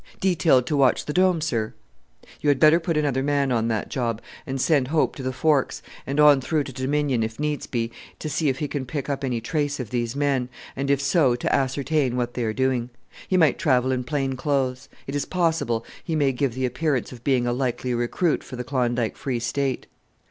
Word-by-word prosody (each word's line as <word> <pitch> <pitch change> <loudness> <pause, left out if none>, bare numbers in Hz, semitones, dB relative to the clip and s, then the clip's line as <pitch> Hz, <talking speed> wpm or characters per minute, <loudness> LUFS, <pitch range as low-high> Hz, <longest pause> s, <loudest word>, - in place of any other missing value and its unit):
"Detailed 165 -9 +3
to 150 - -1
watch 135 -2 +3
the 150 - -3
Dome, 185 -2 +3
sir." 115 -9 -2 0.7
"You 150 - +2
had 140 -2 +3
better 155 +3 +6
put 165 -1 -1
another 140 -3 +1
man 140 -1 +1
on 115 -2 +1
that 110 -3 -1
job, 115 -4 -1 0.3
and 135 0 -3
send 140 -2 +2
Hope 155 +2 +1
to - - -7
the 130 0 -2
Forks, 145 0 +1 0.2
and 140 +2 -1
on 145 -2 +7
through 155 +2 0
to 135 - -8
Dominion, 135 -1 0
if 110 +2 -3
needs 150 -1 -2
be, 115 -2 -2 0.3
to - - -5
see 155 0 0
if 130 - -1
he 150 - -2
can 140 -3 -4
pick 140 +2 -4
up 140 0 -3
any 125 -3 -1
trace 145 +4 -2
of 120 -5 -5
these 120 0 -1
men, 140 -3 0 0.3
and 140 +1 -2
if 140 -1 +3
so 140 -2 +3
to 120 - 0
ascertain 135 0 0
what 120 -1 -1
they 125 - -2
are 110 - 0
doing. 125 0 0 0.4
He 185 - +2
might 160 -6 +4
travel 130 -2 +2
in 125 -1 -1
plain 135 0 -1
clothes. 130 -2 -1 0.2
It 135 - -5
is 145 - -1
possible 165 -10 0 0.2
he 165 - -2
may 145 -3 +3
give 130 -1 -1
the 130 0 0
appearance 130 +1 -1
of 120 -2 -11
being 130 -3 +2
a 120 - +1
likely 125 0 -1
recruit 120 +8 0
for - - -9
the 125 - -4
Klondike 120 -3 0
Free 130 -3 -2
State." 130 +3 -1
135 Hz, 220 wpm, -24 LUFS, 125-150 Hz, 0.7 s, on